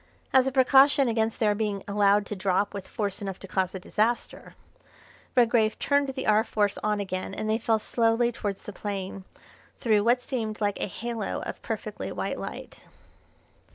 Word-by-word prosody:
As 260 -1 +5
a - - +1
precaution 270 +1 +5
against 225 -1 0
their 210 -2 +3
being 205 -2 -2
allowed 205 0 +3
to 210 - -5
drop 190 +1 0
with 200 -2 -6
force 205 -4 -3
enough 195 -2 -4
to 195 - -11
cause 190 0 -1
a - - -4
disaster, 220 +6 -2 0.8
Redgrave 235 -3 +3
turned 285 -1 +1
the 265 0 -4
R. 215 +1 +4
Force 205 -3 0
on 210 0 0
again 190 -1 -4
and 215 - -3
they 220 +1 +1
fell 225 -1 +2
slowly 230 +2 +1
towards 205 -4 -4
the 210 - -8
plain, 195 -1 -5 0.5
through 215 -3 +3
what 245 +2 +3
seemed 220 -5 -3
like 205 -2 -1
a - - 0
halo 225 +1 -4
of - - -6
perfectly - - -5
white - - -3
light. - - -8
215 Hz, 175 wpm, -27 LUFS, 200-235 Hz, 0.8 s, As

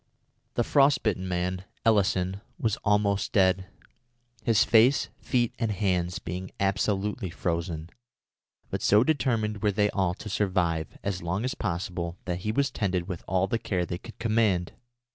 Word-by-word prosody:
The 120 - +2
frost 140 +2 +4
bitten 95 -4 0
man, 90 +1 -2 0.2
Elison, 95 -3 +2 0.2
was 110 -2 0
almost 100 -1 +1
dead, 95 -1 +3 0.7
his 110 -2 +4
face, 115 +5 +4
feet, 120 -3 +1
and 115 -2 0
hands 90 -3 0
being 90 +2 -5
absolutely 100 +1 0
frozen, 85 -2 -3 0.8
but - - -2
so 105 +2 +5
determined 115 -8 0
were 105 -1 +3
they 105 +1 +2
all 95 -2 0
to 110 - -9
survive 90 -6 0
as 100 -2 -2
long 90 +7 -2
as 130 - -1
possible 85 -2 -3
that 90 -1 -2
he 105 +3 -2
was 140 +4 +1
tended 90 -4 -1
with 90 -4 -5
all 95 +1 +2
the 115 +4 -1
care 90 -5 -1
they 85 +1 -4
could 115 - -12
command. 110 -6 +1
100 Hz, 155 wpm, -27 LUFS, 90-110 Hz, 0.8 s, so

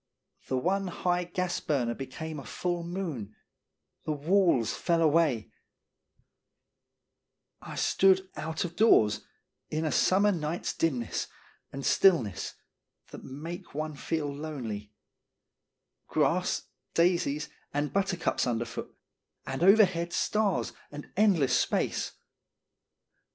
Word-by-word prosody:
The 130 - 0
one 190 +8 0
high 180 0 0
gas 180 0 -2
burner 125 -6 0
became 145 +4 -6
a - - -8
full 175 +3 -2
moon, 165 - -5 0.7
the - - -2
walls 155 - +2
fell 170 -1 +1
away; 155 -8 +2 2.1
I - - -8
stood 190 0 +3
out 160 +3 -3
of 170 -1 -6
doors 110 - +5 0.5
in 155 +1 -1
a 155 - 0
summer 200 +3 +4
night's 165 -2 -2
dimness 130 -8 -1 0.4
and 135 0 -6
stillness 120 - +3 0.6
that - - -9
make 155 +5 -8
one 155 +1 -3
feel 145 0 -3
lonely; 120 -9 -5 1.2
grass, - - +1 0.3
daisies, 165 -4 +2 0.2
and 145 +1 -1
but 195 -1 +2
tercups 175 -7 0
underfoot, 115 -1 -3 0.5
and 135 +3 -4
overhead 180 -3 +5
stars 210 -2 +1 0.2
and 145 0 -9
endless 185 -10 +4
space. - - 0
160 Hz, 110 wpm, -29 LUFS, 135-180 Hz, 2.1 s, doors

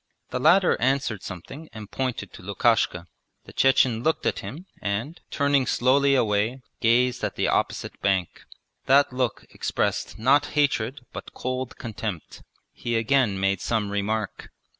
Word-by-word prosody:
The 125 - -2
latter 180 +7 +4
answered 125 -5 0
something 135 - -9
and 110 -2 -9
pointed 125 -7 -3
to - - -11
Lukashka. 100 -2 +1 0.4
The - - -13
Chechen 130 -3 +3
looked 160 +5 0
at - - 0
him 165 +7 -8 0.2
and, 110 +12 -3
turning 140 -2 +2
slowly 140 +2 +3
away, 110 +1 +1 0.2
gazed 125 +2 +2
at - - -2
the - - 0
opposite - - -1
bank. 95 -3 -1 0.4
That 140 0 +5
look 125 -3 -2
expressed - - -2
not 135 +6 +3
hatred 140 -2 +1
but - - -9
cold 130 0 -4
contempt. 110 - -6 0.3
He 120 -1 -3
again 115 -3 +2
made 95 -1 +1
some 110 -3 -1
remark. 105 +1 -2
120 Hz, 140 wpm, -25 LUFS, 105-135 Hz, 0.4 s, That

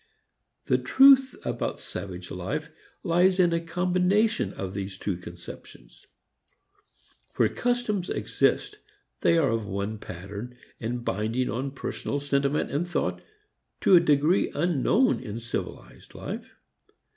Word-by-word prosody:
The - - +2
truth 270 -1 +6
about - - -2
savage - - -7
life - - -4 0.3
lies 180 +1 +3
in 175 -2 +4
a 165 - +2
combination 180 +6 +1
of 95 -1 -5
these 95 -1 -5
two 100 -2 -2
conceptions. 85 -8 -12 1.3
Where - - +3
customs 240 -6 -1
exist 420 0 0 0.4
they 170 - +3
are 145 -6 +3
of 115 -2 -2
one 100 +2 -3
pattern 100 +8 -8 0.2
and 120 +1 -4
binding 110 +6 -1
on 130 +4 -2
personal 140 +1 -4
sentiment 140 +1 0
and 155 +5 -1
thought 175 - -1 0.6
to 190 - +6
a - - +9
degree 155 +2 +3
unknown 175 - +2
in 115 -2 -6
civilized 120 +1 -7
life. - - -6
140 Hz, 120 wpm, -27 LUFS, 110-180 Hz, 1.3 s, a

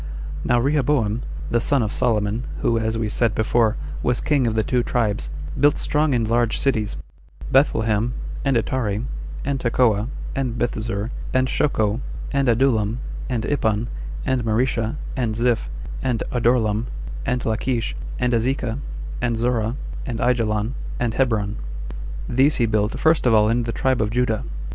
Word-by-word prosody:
Now 120 0 +3
Rehoboam, 130 -4 +2 0.3
the 120 - +3
son 140 0 +2
of 105 - -2
Solomon, 110 -1 +1 0.2
who, 115 -1 +2
as 110 0 -1
we 115 -1 0
said 110 +1 +1
before, 110 +1 +2 0.2
was 125 -1 +1
king 145 -5 +2
of 110 - 0
the 110 - +2
two 125 +2 +1
tribes, 105 - 0 0.3
built 145 0 +5
strong 150 -2 +1
and 115 -2 +1
large 115 -1 +2
cities, 110 -6 0 0.5
Bethlehem, 115 -4 +3 0.3
and 135 -3 +3
Etare, 115 -2 -1 0.4
and 140 0 0
Tekoa, 115 -3 +2 0.3
and 130 -4 -1
Bethzur, 115 -2 -2 0.2
and 130 0 +3
Shoco, 115 -5 +1 0.3
and 140 -2 +2
Adullam, 115 -3 +2 0.3
and 120 -3 -1
Ipan, 110 -5 0 0.4
and 130 -2 +1
Maresha, 115 +1 +1 0.2
and 120 -5 0
Ziph, 120 0 +1 0.3
and 125 -3 0
Adorlam, 115 -2 +2 0.4
and 125 0 -1
Lachlsh, 115 +1 0 0.2
and 125 0 +1
Azekah, 120 +1 0 0.4
and 120 -2 0
Zorah, 115 -1 0 0.3
and 120 -3 -2
Aijalon, 115 -2 +1 0.3
and 120 -2 0
Hebron; 110 -5 +1 0.7
these 135 +4 +4
he 120 - +2
built 105 0 0
first 160 -4 +3
of 115 - +5
all 105 0 +5
in 120 +1 +1
the 115 - -1
tribe 130 0 +1
of 105 - +1
Judah. 115 -1 0
120 Hz, 150 wpm, -22 LUFS, 110-125 Hz, 0.7 s, built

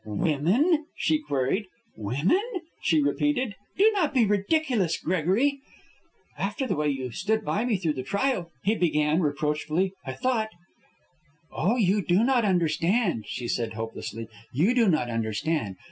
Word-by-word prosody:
"Women?" 180 - +1
she 310 - +2
queried. 185 - -1 0.3
"Women?" 140 - +1 0.4
she 155 -4 +3
repeated. 255 - 0 0.2
"Do 425 +3 +6
not 330 -8 0
be 240 -3 +5
ridiculous, 205 - +1
Gregory." 190 - +1 0.8
"After 205 +7 -2
the - - -1
way 150 -1 0
you 130 -3 -3
stood 220 - -1
by 215 +4 0
me 230 -5 +1
through 165 -5 -1
the 130 - -4
trial," 200 - -1
he 210 - +2
began, 155 -4 +2
reproachfully, 150 +4 0
"I 130 - -5
thought 240 - 0 0.6
" 155 +1 -38
"Oh, 195 +8 +1
you 205 -3 +2
do 180 +3 +2
not 245 -2 +3
understand," 175 - +1
she 120 - -4
said, 115 -2 -2
hopelessly. 115 0 -6 0.2
"You 170 - +2
do 235 -5 +4
not 155 -7 +1
understand. 115 - -1
180 Hz, 145 wpm, -26 LUFS, 145-230 Hz, 0.8 s, Do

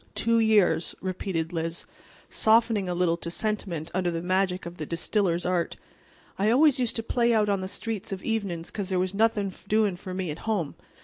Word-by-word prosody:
"Two 230 0 +2
years," 210 -6 +3
repeated 180 -3 -3
Liz, 165 +1 -3 0.4
softening 220 -3 +3
a 175 - -1
little 175 -1 +2
to 170 - -5
sentiment 175 -5 -2
under 180 -1 +1
the 165 0 -3
magic 185 0 0
of 170 +1 -8
the 155 - -4
distiller's 175 0 0
art. 180 -2 0 0.6
"I 205 +2 +3
always 275 +3 +5
used 240 -2 0
to 225 - -2
play 235 0 +2
out 210 -1 +3
on 200 -2 +1
the 185 - -3
street 215 +1 -3
of 190 -1 -5
evenin's 195 -7 -2
'cause 200 -3 -4
there 185 - +1
was 185 +1 0
nothin' 205 -2 +1
doin' 210 -2 +2
for 185 +1 -7
me 185 -4 -2
at 150 - -7
home. 175 -10 0
190 Hz, 195 wpm, -27 LUFS, 175-220 Hz, 0.6 s, always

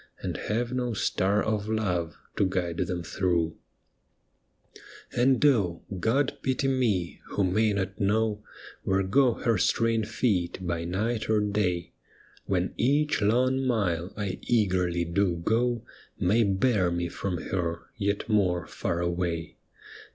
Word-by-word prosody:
And - - -2
have 120 +3 -2
no 125 -3 -1
star 100 +1 +1
of 110 -1 -1
love 90 -7 -1 0.2
to 100 - +2
guide 90 -3 -2
them 90 -1 -2
through! 85 -2 0 1.6
And 130 +3 +3
oh 100 - +2
I - - -3
God 130 +9 +1
pity 130 +1 0
me 115 -10 0
who 100 - -1
may 105 +4 +2
not 100 0 -3
know 105 +1 +1 0.4
Where 95 0 +1
go 120 +5 +3
her 115 -5 +1
straying 115 +1 +2
feet 105 -6 0
by 85 -1 -2
night 110 +6 -1
or 110 -1 +4
day, 100 -5 -1 0.5
When - - 0
each 145 +2 +2
long 130 +5 +2
mile 90 -7 0
I 100 -3 -3
eagerly 90 -6 +1
do 90 +1 +1
go 115 +7 0 0.4
May 105 +6 +3
bear 100 -1 +2
me 85 0 -1
from 90 +1 -3
her 85 -1 -3
yet 100 0 -1
more 95 -6 +2
far 85 0 -3
away 85 -1 -2
100 Hz, 135 wpm, -27 LUFS, 90-115 Hz, 1.6 s, or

